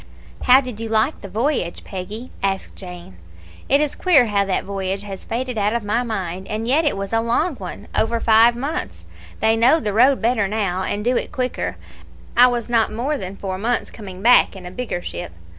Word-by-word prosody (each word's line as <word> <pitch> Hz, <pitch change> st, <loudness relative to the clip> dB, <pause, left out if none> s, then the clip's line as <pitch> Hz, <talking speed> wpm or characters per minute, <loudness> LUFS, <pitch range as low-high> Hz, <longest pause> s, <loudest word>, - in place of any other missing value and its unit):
"How 255 Hz, +2 st, +7 dB
did 250 Hz, -5 st, -7 dB
you 225 Hz, 0 st, -4 dB
like 220 Hz, +7 st, +1 dB
the 200 Hz, -, -8 dB
voyage, 220 Hz, -, -1 dB
Peggy?" 205 Hz, +6 st, -7 dB
asked 195 Hz, -1 st, -2 dB
Jane. 175 Hz, -, -10 dB, 0.5 s
"It 280 Hz, -, +5 dB
is 300 Hz, -1 st, 0 dB
queer 315 Hz, -9 st, +4 dB
how 205 Hz, -2 st, +1 dB
that 195 Hz, -, -1 dB
voyage 195 Hz, 0 st, -3 dB
has 195 Hz, -2 st, -8 dB
faded 250 Hz, -1 st, -3 dB
out 205 Hz, +1 st, +1 dB
of 235 Hz, -2 st, -1 dB
my 215 Hz, +4 st, 0 dB
mind, 190 Hz, -6 st, -4 dB
and 220 Hz, +2 st, -3 dB
yet 300 Hz, +6 st, +3 dB
it 290 Hz, -, +1 dB
was 195 Hz, +2 st, -4 dB
a 225 Hz, -, +3 dB
long 235 Hz, +9 st, +1 dB
one 195 Hz, +2 st, -8 dB
over 230 Hz, +1 st, +1 dB
five 230 Hz, +1 st, +5 dB
months; 280 Hz, +6 st, -4 dB, 0.4 s
they 220 Hz, 0 st, +4 dB
know 245 Hz, +8 st, +4 dB
the 210 Hz, -8 st, -2 dB
road 255 Hz, +5 st, +5 dB
better 225 Hz, -3 st, +1 dB
now, 195 Hz, -3 st, -1 dB
and 205 Hz, +2 st, -3 dB
do 250 Hz, +1 st, +2 dB
it -, -, -3 dB
quicker. 255 Hz, -1 st, -3 dB, 0.6 s
I 245 Hz, +1 st, +8 dB
was 240 Hz, -2 st, -1 dB
not 230 Hz, -2 st, +2 dB
more 255 Hz, +7 st, -1 dB
than 195 Hz, -5 st, -6 dB
four 190 Hz, -1 st, -4 dB
months 235 Hz, +3 st, -1 dB
coming 190 Hz, -3 st, -9 dB
back 245 Hz, -3 st, +5 dB
in 185 Hz, -2 st, -10 dB
a 180 Hz, -, -7 dB
bigger 185 Hz, -4 st, -4 dB
ship. 85 Hz, 0 st, -6 dB
220 Hz, 210 wpm, -21 LUFS, 195-245 Hz, 0.6 s, I